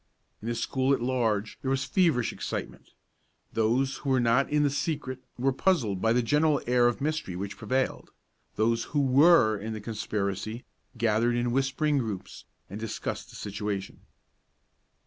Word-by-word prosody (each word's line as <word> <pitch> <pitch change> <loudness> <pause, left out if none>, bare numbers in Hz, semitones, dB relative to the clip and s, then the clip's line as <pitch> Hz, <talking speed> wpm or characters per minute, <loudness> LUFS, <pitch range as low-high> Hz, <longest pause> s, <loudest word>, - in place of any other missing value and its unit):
In 110 - -7
the 120 - -1
school 130 +3 +1
at - - -6
large 115 -5 0
there 130 - -2
was 135 0 +1
feverish 165 - +2
excitement. - - -5 0.6
Those 125 +5 +1
who 140 - -5
were 130 -1 +3
not 120 +3 +3
in 150 0 +2
the 145 - +2
secret 140 -3 -2 0.2
were 135 +2 +1
puzzled 125 - +1
by 115 - +3
the 120 +1 +3
general 150 +4 +3
air 120 0 +4
of 120 +2 -1
mystery 155 - -2
which 100 +2 -5
prevailed. 130 0 -2 0.5
Those 115 +2 +1
who 145 - 0
were 135 -4 +5
in 110 +2 -5
the 110 - -5
conspiracy 105 0 -3 0.3
gathered 115 +1 +2
in 120 0 0
whispering 135 +3 +1
groups, 110 -7 -5 0.2
and 100 - -7
discussed 110 -1 -4
the - - -13
situation. 100 -1 -4
120 Hz, 160 wpm, -28 LUFS, 110-135 Hz, 0.6 s, were